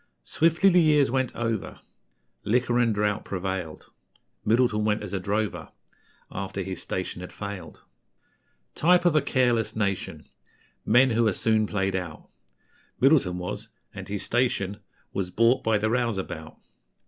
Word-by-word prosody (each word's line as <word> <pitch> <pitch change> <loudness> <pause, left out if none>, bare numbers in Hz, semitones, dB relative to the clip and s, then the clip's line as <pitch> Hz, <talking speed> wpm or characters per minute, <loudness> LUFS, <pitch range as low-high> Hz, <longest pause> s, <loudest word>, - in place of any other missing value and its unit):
Swiftly 165 +4 +2
the 180 -1 +5
years 150 -5 +4
went 130 -1 -1
over, 115 -3 -3 0.6
Liquor 120 +2 +1
and 120 -2 +3
drought 105 0 0
prevailed; 95 -4 -5 0.5
Middleton 115 -1 +2
went 105 0 0
as 100 - -7
a 95 - -1
drover, 105 +3 -2 0.6
After 95 0 -4
his 95 0 -5
station 90 -1 -4
had 90 - -8
failed. 100 -5 -8 0.9
Type 175 +2 +3
of 170 -3 +4
a 155 - +5
careless 120 -5 +1
nation, 100 -4 -2 0.6
Men 125 +3 +5
who 115 0 +2
are 105 - +2
soon 110 +1 +1
played 95 -2 -1
out, 85 -4 -5 0.7
Middleton 130 - +3
was: 90 0 -5 0.2
and - - -8
his 100 0 -4
station 110 -5 0 0.4
Was 95 -2 -2
bought 115 +7 +3
by 110 -1 +2
the 110 +1 0
Rouseabout. 95 -10 -2
110 Hz, 140 wpm, -26 LUFS, 95-125 Hz, 0.9 s, the